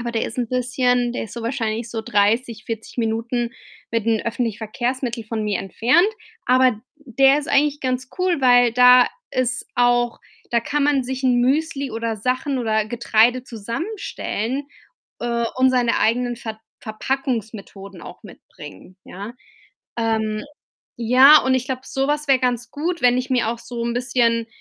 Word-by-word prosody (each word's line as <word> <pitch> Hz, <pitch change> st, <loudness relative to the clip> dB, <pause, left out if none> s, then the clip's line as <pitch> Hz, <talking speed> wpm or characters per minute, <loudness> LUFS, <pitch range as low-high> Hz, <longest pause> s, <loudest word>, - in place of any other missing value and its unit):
aber 235 Hz, 0 st, -3 dB
der 230 Hz, -1 st, -1 dB
ist 225 Hz, -, -8 dB
'n 240 Hz, -2 st, -1 dB
bisschen 250 Hz, -1 st, 0 dB
der -, -, -3 dB
ist 220 Hz, -, -11 dB
so 235 Hz, -, -6 dB
wahrscheinlich 230 Hz, -2 st, -2 dB
so 225 Hz, -1 st, -4 dB
30, 225 Hz, +1 st, 0 dB
40 225 Hz, -1 st, -7 dB
Minuten 230 Hz, +1 st, -1 dB, 0.4 s
mit 230 Hz, -2 st, 0 dB
den 225 Hz, -2 st, +2 dB
öffentlichen 230 Hz, -2 st, -2 dB
Verkehrsmittel 240 Hz, +2 st, -3 dB
von 220 Hz, 0 st, -4 dB
mir 205 Hz, -3 st, -1 dB
entfernt. 245 Hz, -, +2 dB, 0.4 s
Aber 255 Hz, 0 st, +4 dB
d 210 Hz, -, -10 dB, 0.2 s
der 275 Hz, -1 st, +3 dB
ist 295 Hz, -, -5 dB
eigentlich 290 Hz, 0 st, +2 dB
ganz 255 Hz, -1 st, -2 dB
cool, 360 Hz, -5 st, +1 dB
weil 245 Hz, -2 st, +5 dB
da 250 Hz, +1 st, +7 dB, 0.2 s
ist 255 Hz, -2 st, -1 dB
auch 245 Hz, -1 st, +2 dB, 0.3 s
da 235 Hz, -, +2 dB
kann 290 Hz, +5 st, -1 dB
man 285 Hz, -2 st, +2 dB
sich 260 Hz, +1 st, -5 dB
'n 255 Hz, -2 st, +3 dB
Müsli 280 Hz, +1 st, 0 dB
oder 225 Hz, 0 st, -3 dB
Sachen 255 Hz, +5 st, -1 dB
oder 220 Hz, -3 st, 0 dB
Getreide 235 Hz, +2 st, +2 dB
zusammenstellen, 255 Hz, -, -4 dB, 0.5 s
äh, 235 Hz, -1 st, -1 dB
und 260 Hz, 0 st, +4 dB
seine 245 Hz, -2 st, +1 dB
eigenen 240 Hz, +2 st, +1 dB
Ver 220 Hz, -2 st, -7 dB, 0.2 s
Verpackungsmethoden 215 Hz, -5 st, -5 dB
auch -, -, -11 dB
mitbringen, 135 Hz, -, -13 dB
ja? 200 Hz, +5 st, -8 dB, 0.7 s
Ähm, 220 Hz, -2 st, -1 dB, 0.5 s
ja, 260 Hz, +6 st, +7 dB
und 260 Hz, 0 st, +2 dB
ich 255 Hz, -, 0 dB
glaube, 260 Hz, -1 st, -3 dB
sowas 290 Hz, +2 st, -2 dB
wäre 270 Hz, -1 st, +5 dB
ganz 245 Hz, -2 st, -1 dB
gut, 340 Hz, +4 st, -3 dB
wenn 245 Hz, 0 st, +4 dB
ich 255 Hz, +1 st, -4 dB
mir 245 Hz, -3 st, +1 dB
auch 235 Hz, -, -3 dB
so 235 Hz, -1 st, -6 dB
'n 235 Hz, -, -2 dB
bisschen 240 Hz, -2 st, +1 dB
240 Hz, 165 wpm, -21 LUFS, 225-260 Hz, 0.7 s, da